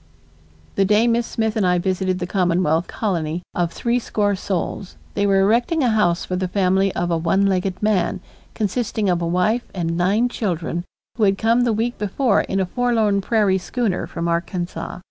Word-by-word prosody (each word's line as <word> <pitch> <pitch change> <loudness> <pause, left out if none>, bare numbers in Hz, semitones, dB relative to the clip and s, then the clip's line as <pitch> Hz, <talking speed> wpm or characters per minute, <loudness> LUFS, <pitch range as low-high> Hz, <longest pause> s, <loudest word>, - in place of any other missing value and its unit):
The 195 - +4
day 210 +4 +3
Miss 235 0 +1
Smith 220 -1 -1
and 215 - +1
I 180 -1 +3
visited 185 0 0
the 180 - -3
Commonwealth 175 -3 +1
colony 170 -5 -2
of 175 -1 0
threescore 225 -3 0
souls, 190 0 -4 0.2
they 205 0 +1
were 195 -1 +4
erecting 240 +10 +2
a 245 - +3
house 180 -6 +1
for 185 - -3
the 185 0 -1
family 190 +1 +2
of 175 0 -1
a 165 - +2
one 190 +4 +2
legged 190 0 -1
man, 195 -3 +1 0.4
consisting 215 -2 -1
of 175 -1 0
a 170 - -1
wife 180 +8 0
and 165 -2 -1
nine 195 +7 +2
children 175 -6 -3 0.3
who 225 - +1
had 195 0 +2
come 230 +3 +2
the 240 -1 +2
week 230 +3 -1
before 210 +2 +1
in 195 - -2
a 190 - +1
forlorn 220 -1 +1
prairie 200 -2 +2
schooner 215 -1 -2
from 170 0 -4
Arkansas. 175 +1 -3
195 Hz, 185 wpm, -21 LUFS, 180-220 Hz, 0.4 s, The